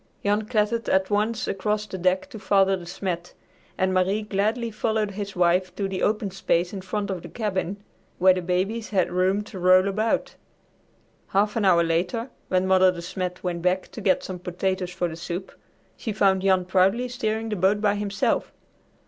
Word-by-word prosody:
Jan 210 +1 +1
clattered 225 0 0
at 190 +1 +2
once 215 +2 0
across 210 +2 -1
the 190 -2 -7
deck 185 +1 +1
to 220 - -8
Father 195 -1 +3
De 175 -2 -9
Smet, 175 -1 -4 0.4
and 185 0 +1
Marie 190 +3 +1
gladly 215 +3 -1
followed 215 -1 -1
his 200 0 -6
wife 180 +1 +2
to 200 - -1
the 190 -1 -4
open 210 -2 0
space 180 -1 0
in 195 - -5
front 200 +2 -3
of 185 -3 -4
the - - -10
cabin 200 -4 -2 0.4
where 185 +1 +6
the 185 - -2
babies 190 +6 -1
had 185 -4 +1
room 185 +3 +1
to 205 -3 -9
roll 185 +1 +5
about. 215 +3 0 0.9
Half 205 +2 +1
an 220 -3 +1
hour 175 -3 +5
later, 180 +9 -1 0.2
when 185 0 +1
Mother 185 0 +5
De 170 -1 -7
Smet 180 0 -4
went 175 -2 -2
back 180 +1 0
to 225 - -8
get 190 -2 +2
some 185 -1 -6
potatoes 180 +1 -2
for 180 -1 -2
the 160 - -6
soup, 175 +3 -5 0.4
she 225 - -4
found 195 -2 +3
Jan 190 -1 +3
proudly 195 +7 +2
steering 225 -2 -2
the 210 - -1
boat 195 +2 +2
by 205 -1 +2
himself. 205 -1 -1
190 Hz, 190 wpm, -25 LUFS, 185-210 Hz, 0.9 s, where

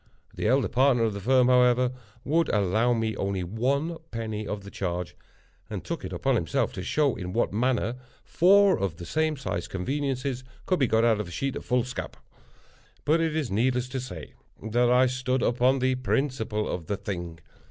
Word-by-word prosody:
The - - -2
elder 130 -1 +3
partner 125 0 +3
of 110 -2 +1
the 100 - -5
firm, 125 +4 +3
however, 125 0 +4 0.3
would 165 +4 +2
allow 105 +4 +2
me 110 -2 0
only 95 -1 -1
one 135 - -1
penny 110 -2 -4
of 105 -1 -4
the 100 - -10
charge, 90 -2 -3 0.5
and - - -5
took - - -5
it - - -5
upon - - 0
himself - - 0
to - - -5
show 145 -5 +1
in 90 -2 -6
what 115 -3 0
manner 120 +1 0 0.3
four 195 +3 +4
of 95 -5 -2
the 85 - -8
same 155 - 0
sized 90 -10 -4
conveniences 130 +4 -2 0.2
could 185 - +1
be 135 - +3
got 115 +1 +3
out 110 -2 +3
of 105 - -3
a - - -9
sheet 135 +6 -2
of - - -6
foolscap. 125 0 -2 0.9
But 160 +3 +3
it 160 -1 0
is 150 -8 -1
needless 125 +4 +1
to 130 +1 -3
say 90 - -8 0.3
that 120 +3 +2
I 125 +1 +5
stood 130 0 -1
upon 125 +3 +3
the 130 0 +1
principle 125 -4 -1
of 85 -3 -4
the 100 - -1
thing. 85 -4 -5
125 Hz, 190 wpm, -27 LUFS, 105-135 Hz, 0.9 s, I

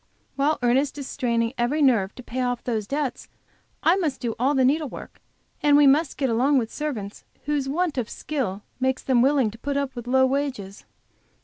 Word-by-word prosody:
While 290 +3 +1
Ernest 265 +4 +2
is 280 -2 -6
straining 235 -3 -1
every 245 +6 +1
nerve 230 -9 +3
to 255 - -10
pay 255 +2 -4
off 245 -1 -1
those 220 -4 -2
debts, 280 -1 -3 0.6
I 340 +4 +4
must 310 -8 -1
do 235 -3 -2
all 270 +4 +2
the 260 -1 +3
needlework, 295 +1 -2 0.4
and 290 -1 +5
we 290 - +6
must 285 +2 +3
get 270 - +1
along 260 +5 +2
with 230 -3 -1
servants 230 -10 -5 0.2
whose 285 -2 -1
want 320 -1 0
of 235 - -3
skill 225 -10 -4 0.2
makes 260 0 0
them 255 -3 +3
willing 265 -4 +3
to 225 - -14
put 280 +2 -2
up 280 -2 -2
with 240 -1 -7
low 260 +1 +4
wages. 260 -8 -3
265 Hz, 195 wpm, -24 LUFS, 240-285 Hz, 0.6 s, we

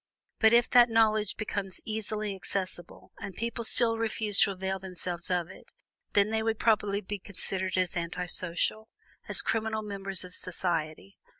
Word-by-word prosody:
But 220 -1 +6
if 240 +1 +5
that 245 -1 +7
knowledge 215 -2 +2
became 200 -2 -3 0.2
easily 215 -1 -2
accessible, 185 -2 -4
and 200 -2 -7
people 235 +1 -3
still 230 0 +3
refused 215 -2 +1
to - - +4
avail 190 0 -3
themselves 180 -2 -2
of 180 -2 0
it, - - -15 0.4
then 205 +1 +3
they 220 0 +1
would 225 0 0
properly 205 -3 +2
be 205 0 -5
considered 190 -1 -4
as 185 0 0
anti 175 +1 -2
social, 180 +5 -1 0.4
as - - +4
criminal 220 -1 -1
members 195 -2 -1
of 180 0 -10
society. 175 0 -2
200 Hz, 160 wpm, -29 LUFS, 185-220 Hz, 0.4 s, that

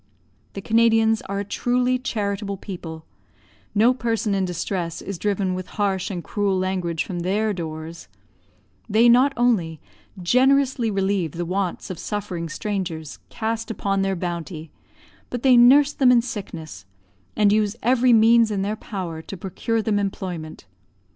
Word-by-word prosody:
The 195 - -7
Canadians 225 -1 +3
are 200 0 -2
a - - -5
truly 250 +4 0
charitable 200 -4 -3
people; 165 -5 -8 0.7
no 230 +5 +5
person 230 -3 -1
in 195 -1 +1
distress 175 -1 -3
is 195 -3 -6
driven 200 -2 0
with 185 0 -5
harsh 195 -3 0
and 180 -4 -5
cruel 200 -2 0
language 185 -3 -1
from 180 -3 -5
their 205 +5 0
doors; 160 -1 -7 0.8
they 225 +3 +5
not 250 +4 +5
only 190 -11 +1 0.4
generously 255 +4 +3
relieve 195 -5 0
the 175 +1 -3
wants 185 +1 -3
of 180 - -7
suffering 185 -5 -4
strangers 170 -5 -4
cast 225 +1 -3
upon 195 -2 -1
their 195 0 0
bounty, 170 -2 -5 0.6
but 245 -1 -5
they 260 -2 +6
nurse 275 +5 +6
them 260 -2 +4
in 240 -2 +4
sickness, 165 - -7 0.5
and 205 -1 +4
use 210 0 +1
every 250 +1 +4
means 230 0 +5
in 200 -2 -1
their 210 +2 -1
power 185 -7 -6
to 195 - -9
procure 215 +5 -2
them 210 -2 +1
employment. 180 -5 -5
200 Hz, 150 wpm, -23 LUFS, 180-225 Hz, 0.8 s, they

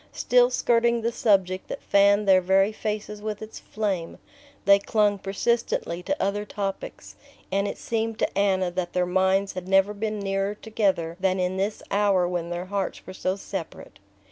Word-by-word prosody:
Still 245 0 +4
skirting 235 -1 +2
the 230 - +1
subject 190 -5 +1
that - - -6
fanned 200 +1 +4
their 190 -1 +6
very 195 +3 +3
faces 210 -1 -4
with 210 -1 -4
its 215 - -9
flame, 195 -6 -3 0.5
they 200 0 +7
clung 205 -1 +1
persistently 195 -3 -1
to 290 +11 -2
other 205 +1 0
topics, 200 -1 -6 0.4
and 200 +1 +1
it - - -5
seemed 225 -1 -2
to - - -1
Anna 190 -3 +1
that 175 -1 -3
their 180 0 +1
minds 190 +2 +1
had 185 0 -6
never 195 +2 +3
been 215 0 -3
nearer 195 +1 -1
together 195 -7 -1
than 190 0 +1
in 180 +1 -1
this 200 +2 -2
hour 200 -3 +3
when 175 -1 -3
their 175 +1 -4
hearts 195 0 -3
were 185 - -8
so 185 0 -1
separate. 190 - -7
200 Hz, 170 wpm, -25 LUFS, 185-210 Hz, 0.5 s, they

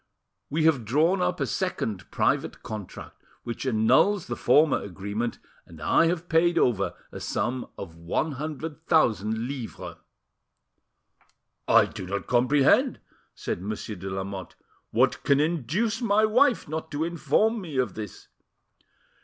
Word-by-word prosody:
We 155 +3 0
have 155 -7 +3
drawn 160 - +2
up 180 0 0
a - - +1
second 115 - -3
private - - 0
contract, 105 -4 -8 0.2
which 120 +3 -5
annuls 130 - +3
the 120 - -4
former 145 +5 +4
agreement, 100 +5 -4 0.3
and 85 -1 -13
I 80 - +3
have 175 0 -2
paid 170 +1 +3
over 110 - +1 0.2
a - - -7
sum 125 +1 -2
of 85 -4 -8
one 85 - -1
hundred 155 +2 -6
thousand 110 - +2
livres." 130 -4 -7 1.7
"I - - +6
do 95 - -8
not 100 -2 -3
comprehend," 130 +3 +3 0.4
said - - -4
Monsieur 105 +2 -5
de 95 +1 -6
Lamotte. 95 -1 -5 0.3
"What - - +2
can 140 0 +3
induce 170 - 0
my 215 -2 +3
wife 245 +3 +3
not 160 +1 -4
to 145 +2 -1
inform 210 +7 +1
me 160 -7 -6
of 130 -1 0
this?" 105 -4 -8
135 Hz, 135 wpm, -26 LUFS, 110-165 Hz, 1.7 s, I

